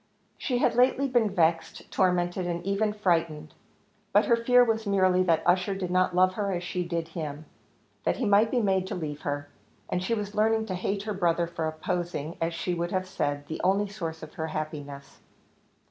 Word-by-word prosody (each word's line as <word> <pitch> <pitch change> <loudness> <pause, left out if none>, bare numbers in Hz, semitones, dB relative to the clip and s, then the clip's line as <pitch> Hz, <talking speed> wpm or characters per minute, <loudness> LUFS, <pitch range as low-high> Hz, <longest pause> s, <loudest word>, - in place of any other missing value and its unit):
She 250 - -1
had - - +2
lately 255 +3 +3
been 240 -4 +2
vexed, 165 -3 0
tormented, 180 -1 +1
and 175 0 -3
even 200 +2 +1
frightened; 170 -7 -1 0.6
but - - +4
her 235 - +4
fear 245 +2 +5
was 225 -2 0
merely 185 -2 +3
that 165 -3 +2
Ussher 180 +2 +2
did 185 -2 -3
not 185 0 +2
love 185 +1 +4
her 200 0 -2
as 175 -1 -2
she 180 +1 -2
did 170 -1 -3
him 155 -2 -6 0.6
that - - 0
he - - -1
might 205 +2 +4
be 245 0 +1
made 190 -3 +1
to - - -4
leave 150 -3 -5
her; 145 0 -3 0.4
and 180 - -1
she 230 +5 0
was 205 -1 -4
learning 220 +1 +2
to 195 - -4
hate 195 +2 -2
her 215 0 -3
brother 175 -3 +1
for 165 -1 -3
opposing, 170 -1 -3
as 165 0 -1
she 180 - -2
would 170 0 -2
have 185 0 -2
said, 145 -6 -2
the 160 - -5
only 195 +3 +2
source 165 -6 -6
of 155 - -10
her 160 - -3
happiness. 145 -3 -6
180 Hz, 200 wpm, -27 LUFS, 165-205 Hz, 0.6 s, fear